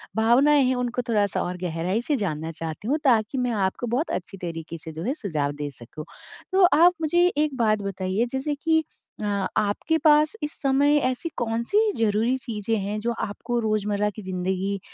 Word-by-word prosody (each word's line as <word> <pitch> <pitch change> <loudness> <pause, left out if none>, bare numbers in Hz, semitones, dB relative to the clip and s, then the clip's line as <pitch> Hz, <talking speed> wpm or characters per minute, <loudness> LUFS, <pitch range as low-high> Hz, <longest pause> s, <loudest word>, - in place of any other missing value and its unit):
भावनाएँ 265 +6 +4
हैं 255 0 +2
उनको 245 0 -1
थोड़ा-सा 205 -3 +1
और 180 0 -4
गहराई 180 +6 -1
से 290 +3 0
जानना 160 -5 -3
चाहती 165 +6 -6
हूँ 295 +4 +2
ताकि 235 -1 +2
मैं 250 -1 0
आपको 200 +3 -1
बहुत 255 +8 -1
अच्छी 195 +2 -5
तरीके 165 -2 -6
से 160 +1 -9
जो 160 +2 -6
है 260 - 0
सुझाव 150 -8 -1
दे 145 - -2
सकूँ। 140 +6 -9 0.5
तो 380 -1 +5
आप 350 +3 +6
मुझे 345 +3 +3
एक 300 -3 +1
बात 215 -3 +2
बताइए 195 +2 -1
जैसे 275 +2 -2
कि 320 -1 +3 0.4
अ, - - -4 0.3
आपके 215 +10 +1
पास 305 +1 +4
इस 295 - -2
समय 285 +2 +3
ऐसी 255 +6 -1
कौन-सी 235 - -1 0.2
ज़रूरी 225 +3 +2
चीज़ें 225 -3 -3
हैं 205 +2 -3
जो 235 +2 -1
आपको 240 +4 -3
रोज़मर्रा 210 -1 0
की 215 - -7
ज़िंदगी 190 +1 -2
220 Hz, 180 wpm, -24 LUFS, 190-265 Hz, 0.5 s, आप